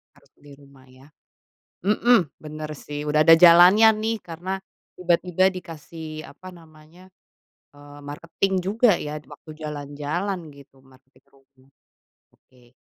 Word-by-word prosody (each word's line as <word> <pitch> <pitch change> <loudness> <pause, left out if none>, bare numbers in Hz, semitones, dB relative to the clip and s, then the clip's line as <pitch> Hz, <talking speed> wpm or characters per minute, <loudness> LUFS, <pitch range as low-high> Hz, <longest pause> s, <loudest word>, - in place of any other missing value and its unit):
Harus - - -26
beli 145 -1 -18
rumah 140 -1 -20
ya. 130 +2 -19 0.8
Mhm, 235 +4 +4 0.2
benar 155 0 -8
sih 145 +1 -8
udah 150 +1 +2
ada 165 +1 +7
jalannya 180 +5 +7 0.2
nih 225 +1 -1
karena 180 +3 -6 0.4
tiba-tiba 180 +1 +1
dikasih 160 -2 -9
apa 185 +6 -13
namanya, 165 +1 -18 0.7
eee, 145 0 -15
marketing 165 +6 -3
juga 210 +4 +2
ya 150 0 -5
waktu 145 +3 -15
jalan-jalan 150 +6 -4
gitu, 140 -1 -19
marketing 130 0 -25
rumah. 135 0 -28 0.7
Oke. 125 -2 -26
155 Hz, 120 wpm, -23 LUFS, 145-180 Hz, 0.8 s, ada